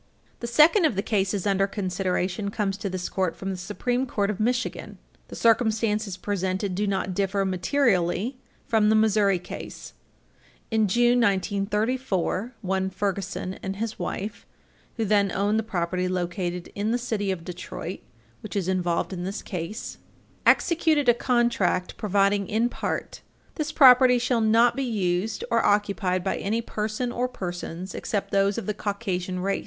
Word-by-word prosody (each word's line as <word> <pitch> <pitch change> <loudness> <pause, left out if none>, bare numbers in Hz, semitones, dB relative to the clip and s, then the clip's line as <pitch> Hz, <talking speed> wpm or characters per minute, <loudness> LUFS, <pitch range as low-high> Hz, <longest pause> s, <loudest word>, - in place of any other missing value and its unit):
The 235 - -4
second 310 - +5
of 295 - +2
the 195 - -1
cases 200 -2 0
under 195 -1 +2
consideration 185 0 -2
comes 200 -1 -1
to 200 -1 -3
this 185 -1 -3
Court 185 -4 -1
from 195 0 -4
the - - -3
Supreme 245 +8 -2
Court 205 -4 0
of 205 - -6
Michigan. 245 +3 -1 0.3
The - - -9
circumstances 220 -3 +2
presented 190 0 -2
do 205 +3 -1
not 190 -1 -1
differ 195 +1 0
materially 195 +2 +1 0.3
from 215 -2 +3
the 220 - +4
Missouri 210 -3 +3
case. 175 - -9 0.8
In 220 -1 +3
June, 240 +4 +3
1934, 210 +2 0
one 190 0 0
Ferguson 195 -1 -3
and 195 0 -4
his 220 +1 -4
wife, 205 +1 -5 0.5
who 225 - 0
then 200 -1 +3
owned 205 +3 +1
the - - +2
property 180 -3 -2
located 175 -1 -3
in 205 +2 -2
the 240 - +2
city 220 -5 -2
of 175 -3 -3
Detroit 180 0 -6 0.4
which - - -8
is 195 -3 -1
involved 180 -1 0
in 175 -1 -4
this 195 +3 -4
case, 185 +5 -5 0.5
executed 315 -5 +3
a - - +7
contract 235 -7 +1
providing 200 -1 +2
in 230 +2 +1
part: - - -4 0.3
"This 305 -1 -3
property 255 -3 +7
shall 245 -1 +1
not 230 +2 +4
be 275 - -2
used 205 - -1
or - - +3
occupied 200 -3 +1
by 190 - -1
any 225 +4 -1
person 220 +3 -3
or 245 +1 -1
persons 180 -3 -6
except 205 -2 -3
those 195 0 +2
of - - -3
the 210 - -1
Caucasian 190 -4 -3
race. 195 +1 0
200 Hz, 160 wpm, -25 LUFS, 185-225 Hz, 0.8 s, a